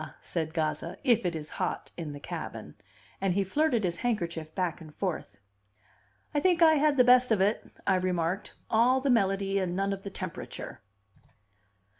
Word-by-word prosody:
said 160 -2 -3
Gazza. 160 +1 -2
"If 235 -7 +3
it 175 - -2
is 155 -1 -6
hot - - -2
in 160 -3 -5
the 145 - -8
cabin!" - - -6 0.5
And 190 -2 +1
he 200 - +2
flirted 245 - +1
his 170 -2 -1
handkerchief 170 -9 -2
back 175 -2 -1
and 155 -1 -11
forth. 160 - -3 1.0
"I 295 - +2
think 350 +1 +3
I 320 -1 +7
had 295 0 +3
the 250 - +7
best 250 0 +5
of 215 - +4
it," 200 +4 0
I 190 - +3
remarked. 180 +1 -1
"All 245 +4 +4
the 270 0 +1
melody 195 -3 +2
and 180 -2 -1
none 195 +1 0
of 195 - -6
the 200 - -6
temperature." 185 -9 -7
195 Hz, 175 wpm, -29 LUFS, 170-240 Hz, 1.0 s, I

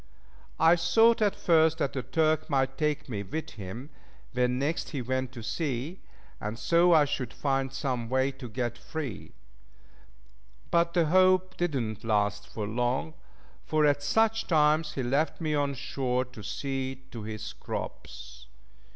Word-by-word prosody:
I 165 +2 +6
thought 225 +8 +4
at 205 -2 +3
first 160 -1 +3
that 140 -5 -1
the 130 - -2
Turk 155 +4 +1
might 135 -2 +1
take 150 0 -1
me 105 -6 -3
with 150 +11 -5
him 115 +8 -8 0.4
when 125 0 +1
next 145 +5 -1
he 140 - -3
went 130 +1 -2
to 120 -3 -8
sea, 145 - -3 0.4
and 105 +2 -4
so 170 +11 +4
I 155 -3 +6
should 130 -4 -3
find 135 -2 -1
some 130 -4 -2
way 130 +1 +2
to 130 -2 -9
get 120 +1 -3
free; 145 -9 -6 1.4
but 170 0 +2
the 170 -2 +4
hope 185 +2 +4
did 175 -4 -1
not 110 -5 -3
last 105 -1 -1
long, 120 +8 -1 0.5
for 155 -1 +2
at 145 -1 +3
such 225 +9 +2
times 155 -1 +3
he 135 - -2
left 140 +6 0
me 155 -2 -1
on 145 -1 0
shore 125 0 -1
to 125 -3 -12
see 130 +4 -4
to 115 - -7
his 110 0 -6
crops. 65 +1 -7
135 Hz, 155 wpm, -28 LUFS, 120-160 Hz, 1.4 s, I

